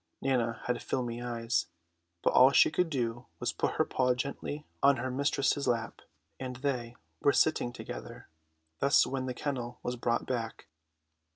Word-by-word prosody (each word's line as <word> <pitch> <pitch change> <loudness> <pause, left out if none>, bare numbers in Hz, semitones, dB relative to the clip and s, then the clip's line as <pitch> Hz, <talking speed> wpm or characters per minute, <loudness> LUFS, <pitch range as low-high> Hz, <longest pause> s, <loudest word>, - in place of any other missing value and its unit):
Nana 120 -4 0
had 125 -1 -1
filmy 120 -2 -2
eyes, 120 -1 -1 0.6
but - - +3
all 130 +2 +8
she - - +6
could 180 +1 +1
do 120 -4 -2
was - - -1
put - - 0
her - - +2
paw 125 -1 +1
gently 140 +3 -4 0.2
on 140 -1 +5
her 130 +2 -2
mistress's 140 +1 +1
lap; 115 -3 -1 0.4
and 130 -1 -4
they 125 -3 -2 0.3
were 140 - +5
sitting 155 -6 +2
together - - -8 0.5
thus 140 - +5
when 130 -1 -3
the 125 - -3
kennel 125 -4 -3
was 125 - -2
brought 120 0 0
back. 115 -3 -3
125 Hz, 160 wpm, -31 LUFS, 120-135 Hz, 0.6 s, all